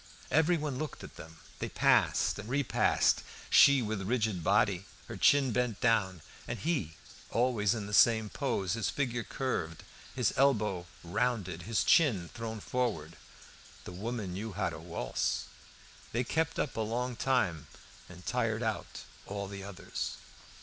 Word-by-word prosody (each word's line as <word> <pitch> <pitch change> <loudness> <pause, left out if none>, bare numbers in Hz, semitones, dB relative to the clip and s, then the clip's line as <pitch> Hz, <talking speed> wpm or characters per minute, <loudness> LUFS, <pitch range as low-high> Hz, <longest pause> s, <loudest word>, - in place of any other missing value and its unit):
Everyone 155 -3 +2
looked 155 - -5
at - - -10
them. 80 0 -11 0.2
They - - -3
passed - - +3
and 105 +2 -7
re 140 +3 +1
passed, - - +2 0.3
she 140 -3 +7
with 105 -2 -2
rigid 105 -4 -1
body, 100 0 +2 0.2
her - - -6
chin 140 -3 +4
bent 120 -3 0
down, 100 -8 +1 0.2
and 120 - -3
he 145 - -2 0.3
always 115 -3 +2
in 105 -3 -4
the 105 - -7
same 110 0 +5
pose, 100 -7 -1
his 110 -5 -1
figure 120 -4 -1
curved, 110 -11 -3 0.3
his 125 -4 +1
elbow 105 -10 +2 0.2
rounded, 100 -2 -1
his 115 - +2
chin 115 - +3
thrown 110 -1 -5
forward. 100 -10 -2 0.7
That - - -8
woman 105 0 -4
knew 105 +3 -5
how - - -1
to - - -7
waltz! - - -2 0.7
They 120 +2 +1
kept 160 +6 -1
up 140 - -2
a 115 - -1
long 120 +3 -2
time, 115 - 0 0.4
and 90 0 -12
tired 115 -2 0
out 110 -2 -3 0.2
all 100 0 -4
the 100 0 -7
others. 100 -2 -5
110 Hz, 150 wpm, -31 LUFS, 95-125 Hz, 0.7 s, she